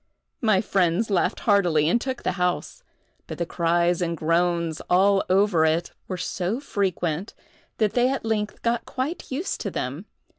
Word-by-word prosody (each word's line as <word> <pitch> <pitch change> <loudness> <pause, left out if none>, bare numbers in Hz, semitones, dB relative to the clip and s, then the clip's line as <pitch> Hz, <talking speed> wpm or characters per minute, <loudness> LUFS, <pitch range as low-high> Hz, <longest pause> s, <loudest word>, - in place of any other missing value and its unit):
My 215 -5 +3
friends 195 +1 +1
laughed 185 +1 +1
heartily 175 -8 +3
and 235 +8 +2
took 260 -2 -4
the - - +1
house; 180 - -1 0.5
but - - -6
the 170 - -1
cries 170 +1 +1
and 170 -1 -1
groans 170 0 0
all 195 +2 +4
over 190 -3 +3
it 160 +2 +1 0.2
were 185 - -4
so 185 +5 -2
frequent, 190 - -2 0.4
that 215 -2 +1
they 245 +1 +3
at 270 -3 -2
length 210 -2 -2
got 235 0 0
quite 270 +7 -4
used 300 +8 -3
to - - -2
them. - - -4
185 Hz, 160 wpm, -24 LUFS, 170-220 Hz, 0.5 s, all